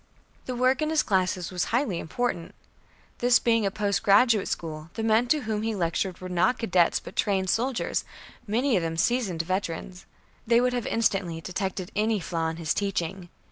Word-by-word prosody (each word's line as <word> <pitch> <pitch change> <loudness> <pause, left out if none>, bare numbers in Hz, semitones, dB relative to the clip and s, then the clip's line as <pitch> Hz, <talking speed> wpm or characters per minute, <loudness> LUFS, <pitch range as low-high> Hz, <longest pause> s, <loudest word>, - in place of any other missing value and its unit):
The 255 - -3
work 255 +3 +2
in 310 - +1
his 315 -1 +2
classes 185 -3 0
was 180 -1 -1
highly 230 -7 0
important. 175 0 -3 0.6
This 245 0 +5
being 230 -3 +2
a - - +1
post 200 0 -1
graduate 210 +1 +4
school, 155 -1 -5
the 225 - -3
men 225 +2 +3
to 300 +4 +2
whom 215 -3 -2
he 225 0 -1
lectured 180 +1 -1
were 185 - -7
not 180 +8 +2
cadets 185 -8 +2
but - - -11
trained 190 -3 +1
soldiers, 250 +2 -1 0.4
many 240 +4 +1
of 185 - +2
them 165 0 -3
seasoned 195 -5 +1
veterans. 185 0 -4 0.4
They 235 0 +5
would 250 0 +1
have 245 -2 -2
instantly 195 -7 0
detected 185 +1 -4
any 215 +1 +1
flaw 165 -2 -2
in 160 - -5
his 160 -2 -1
teaching. 190 -2 -3
200 Hz, 180 wpm, -26 LUFS, 180-235 Hz, 0.6 s, This